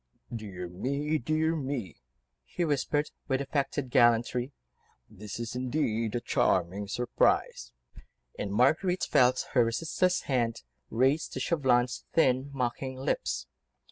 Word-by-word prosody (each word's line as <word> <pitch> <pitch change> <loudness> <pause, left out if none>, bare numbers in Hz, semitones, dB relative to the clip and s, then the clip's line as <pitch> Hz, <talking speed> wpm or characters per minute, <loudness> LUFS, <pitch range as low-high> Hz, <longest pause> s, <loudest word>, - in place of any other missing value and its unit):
"Dear 95 -5 -6
me! 140 - -1
dear 155 +5 0
me!" 130 - -4 0.4
he 175 - -2
whispered, 145 0 0 0.2
with 135 -2 +1
affected 140 -1 -2
gallantry, 120 +2 +3 0.6
"this 105 +1 -8
is 120 -1 -4
indeed 120 -4 -1
a - - +1
charming 95 -3 0
surprise," 100 - 0 0.6
and 100 - -4
Marguerite 155 - +2
felt 125 0 +3
her 120 - +4
resistless 165 +10 0
hand 120 - -1 0.3
raised 135 +7 +1
to - - -3
Chauvelin's 130 -5 +1
thin, 130 -3 +3
mocking 130 0 -3
lips. 70 - -2
125 Hz, 115 wpm, -29 LUFS, 115-145 Hz, 0.6 s, her